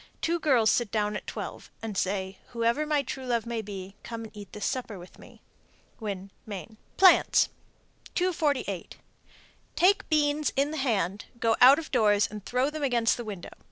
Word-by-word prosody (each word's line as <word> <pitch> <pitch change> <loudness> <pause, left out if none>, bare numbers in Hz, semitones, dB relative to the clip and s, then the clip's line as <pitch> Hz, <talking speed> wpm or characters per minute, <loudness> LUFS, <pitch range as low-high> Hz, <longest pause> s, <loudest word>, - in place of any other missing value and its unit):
Two 340 +1 0
girls 255 -9 +4
sit 240 -3 +1
down 210 -1 0
at - - -6
twelve, - - -6
and 220 -2 -5
say, 190 0 -2
"Whoever 235 +6 +1
my 295 -2 +2
true 260 0 -6
love 235 -2 0
may 235 -1 -3
be, 195 -2 -8
come 230 -1 -6
and 220 -1 -11
eat 205 -2 -10
this 210 - -5
supper 240 -5 -3
with 175 0 -13
me." - - -16 0.6
Winn, 200 -3 -5 0.2
Me. 210 +1 -7 0.2
PLANTS. 375 -1 +6 0.7
248. 295 - -1 0.8
Take 385 +3 +3
beans 300 -1 +2
in 280 +2 +1
the 315 - -4
hand, 205 - 0
go 225 -1 +3
out 260 +3 +9
of 320 -1 -6
doors 210 -5 +4
and 210 -2 -7
throw 255 +6 0
them 310 0 -5
against 240 -4 +2
the 240 - -6
window. 200 -5 -7
230 Hz, 175 wpm, -28 LUFS, 205-285 Hz, 0.8 s, out